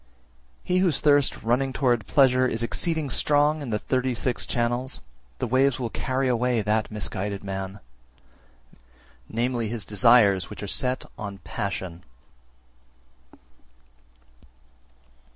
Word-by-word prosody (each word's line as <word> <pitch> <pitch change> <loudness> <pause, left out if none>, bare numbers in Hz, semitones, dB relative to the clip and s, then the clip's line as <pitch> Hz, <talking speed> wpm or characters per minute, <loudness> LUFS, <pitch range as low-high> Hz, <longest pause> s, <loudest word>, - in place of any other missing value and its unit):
339. 180 - 0
He 185 - +3
whose 170 -7 +2
thirst 145 -2 +2
running 125 +4 +1
towards 120 -5 +1
pleasure 130 -2 +4
is 115 -1 -2
exceeding 160 +3 -1
strong 150 +3 +2
in 140 - -5
the 105 - 0
thirty 130 +2 -1
six 125 +1 -1
channels, 120 - -1 0.4
the - - -2
waves 130 +2 +2
will 120 -3 -3
carry 130 0 -1
away 125 -2 +1
that 110 +1 0
misguided 100 -1 -3
man, 95 0 -5 1.5
viz. 120 -1 -1
his 115 -2 -4
desires 105 -5 +4
which - - -8
are - - -4
set 125 +6 -1
on 100 -2 -6
passion. 95 -3 -5
120 Hz, 120 wpm, -25 LUFS, 105-130 Hz, 1.5 s, pleasure